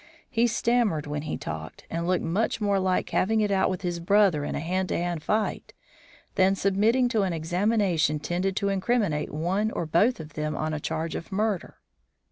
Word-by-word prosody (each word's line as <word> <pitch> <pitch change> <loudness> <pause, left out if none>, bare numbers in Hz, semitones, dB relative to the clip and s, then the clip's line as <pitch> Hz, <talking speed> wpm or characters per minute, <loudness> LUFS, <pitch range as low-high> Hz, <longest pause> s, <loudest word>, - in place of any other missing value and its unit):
He 235 0 +3
stammered 230 -8 +1
when 150 0 -3
he 155 - -4
talked, 80 0 -7
and 170 +1 -3
looked 185 0 +1
much 195 +9 0
more 200 -2 +1
like 185 -1 0
having 220 +3 +2
it 210 -1 +1
out 190 -1 +2
with 185 +1 -4
his 175 -1 -2
brother 185 -3 +3
in - - -3
a - - -2
hand 185 +3 -1
to - - 0
hand 175 -2 -2
fight 215 +7 -1 0.6
than 190 +1 +3
submitting 215 +7 +2
to 225 -3 +1
an 190 -3 0
examination 175 -1 +1
tending 180 +5 -1
to 200 0 0
incriminate 195 -5 0
one 180 +8 0
or 170 - -3
both 175 +10 +2
of 155 -2 -9
them 155 0 -2
on 155 0 -2
a 155 - -2
charge 160 +2 -3
of 165 - -6
murder. 205 -2 -1
185 Hz, 195 wpm, -26 LUFS, 160-210 Hz, 0.6 s, He